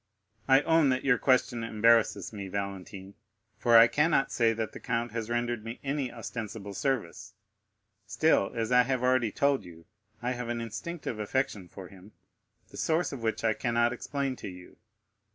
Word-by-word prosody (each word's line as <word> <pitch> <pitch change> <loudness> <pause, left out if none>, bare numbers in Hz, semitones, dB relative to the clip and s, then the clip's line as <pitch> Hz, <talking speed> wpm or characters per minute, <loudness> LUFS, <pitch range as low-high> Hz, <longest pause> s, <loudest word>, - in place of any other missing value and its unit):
30157m - - +6
"I 135 - +6
own 160 -3 +4
that 130 0 0
your 125 -3 +3
question 125 -3 +2
embarrasses 115 -3 +2
me, 100 -2 -6
Valentine, 100 0 -6 0.5
for 120 -1 +5
I 115 - +10
cannot 150 +2 +2
say 115 -2 +3
that 110 -1 -3
the - - -10
count 120 -2 -2
has 115 0 -4
rendered 120 -1 -1
me 115 +2 -7
any 140 -2 -2
ostensible 110 -3 -6
service. 110 -9 -3 0.7
Still, 115 -1 +2
as 115 0 -2
I 125 0 +6
have 125 0 -1
already 125 -3 +2
told 140 +4 +1
you, 85 -1 -14 0.3
I 120 +2 -2
have 125 -1 -4
an 120 0 -2
instinctive 115 +3 -5
affection 105 -3 -2
for 95 +1 -10
him, 95 +2 -16 0.6
the - - -12
source 165 +2 0
of 135 - -7
which 110 0 -2
I 110 -1 +3
cannot 120 +1 +1
explain 135 +1 -3
to - - -7
you. 90 -1 -11
115 Hz, 175 wpm, -29 LUFS, 105-130 Hz, 0.7 s, I